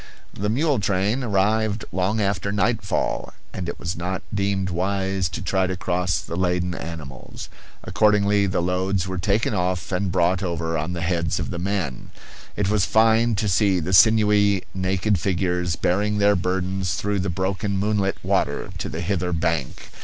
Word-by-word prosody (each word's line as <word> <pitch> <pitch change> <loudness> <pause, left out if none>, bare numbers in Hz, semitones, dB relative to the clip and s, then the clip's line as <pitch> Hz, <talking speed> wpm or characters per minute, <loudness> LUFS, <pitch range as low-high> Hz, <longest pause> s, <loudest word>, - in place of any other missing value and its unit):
The 105 +1 -2
mule 140 +3 +1
train 100 +5 0
arrived 105 0 +1
long 95 +4 0
after 100 -1 0
night 105 +2 +1
fall, 95 - -2 0.2
and 90 -2 -4
it - - -5
was 85 +1 -4
not 90 +2 -3
deemed 100 -2 0
wise 95 0 -1
to 85 - -5
try 95 0 +1
to 95 0 -3
cross 90 -1 0
the 85 - -6
laden 90 0 0
animals. 80 -7 -8 0.3
Accordingly 105 -1 +3
the 90 -2 0
loads 95 +1 0
were 95 -1 -3
taken 105 +5 +1
off 90 -3 -1
and 95 0 -1
brought 90 +1 +2
over 85 -3 -2
on 80 +3 -2
the 85 - -4
heads 85 -1 0
of - - -3
the 85 - -4
men; 90 -8 -3 0.5
it 105 - 0
was 105 -1 +2
fine 115 +1 +3
to 105 +1 -1
see 95 0 +3
the 90 +3 -3
sinewy, 105 0 +5
naked 95 +1 0
figures 90 -2 0
bearing 105 +6 0
their 100 0 +4
burdens 90 -1 -1
through 100 0 -1
the 95 +1 -1
broken 95 +2 -1
moonlit 100 -1 0
water - - 0
to - - -3
the 80 - -4
hither 90 0 -1
bank. 85 -5 -2
95 Hz, 170 wpm, -23 LUFS, 90-100 Hz, 0.5 s, sinewy